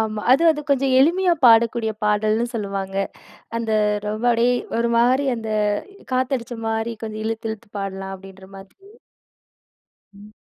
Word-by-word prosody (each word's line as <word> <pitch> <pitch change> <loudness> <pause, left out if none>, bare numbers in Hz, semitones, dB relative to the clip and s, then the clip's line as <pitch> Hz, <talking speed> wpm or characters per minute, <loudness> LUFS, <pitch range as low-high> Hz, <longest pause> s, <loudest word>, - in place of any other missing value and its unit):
ஆமா. 215 -1 -2
அது 275 +6 +4
அது 305 -2 -1
கொஞ்சம் 270 -1 +2
எளிமையா 350 +6 +3
பாடக்கூடிய 230 -1 +4
பாடல்ன்னு 215 +2 +1
சொல்லுவாங்க. 195 -3 -4 0.6
அந்த 230 -1 -3 0.4
ரொம்ப 215 +2 -4
அப்படியே 235 +2 +2 0.2
ஒரு 235 0 +1
மாரி 255 +4 +3
அந்த 225 -1 -5 0.6
காத்தடிச்ச 255 -2 -1
மாரி 225 +1 -2
கொஞ்சம் 215 0 -5
இழுத்து, 225 +1 -3
இழுத்து 220 0 -10
பாடலாம். 195 0 -5
அப்படின்ற 190 0 -14
மாதிரி. 390 - -16 1.2
ம். 205 +1 -15
225 Hz, 130 wpm, -21 LUFS, 210-245 Hz, 1.2 s, அது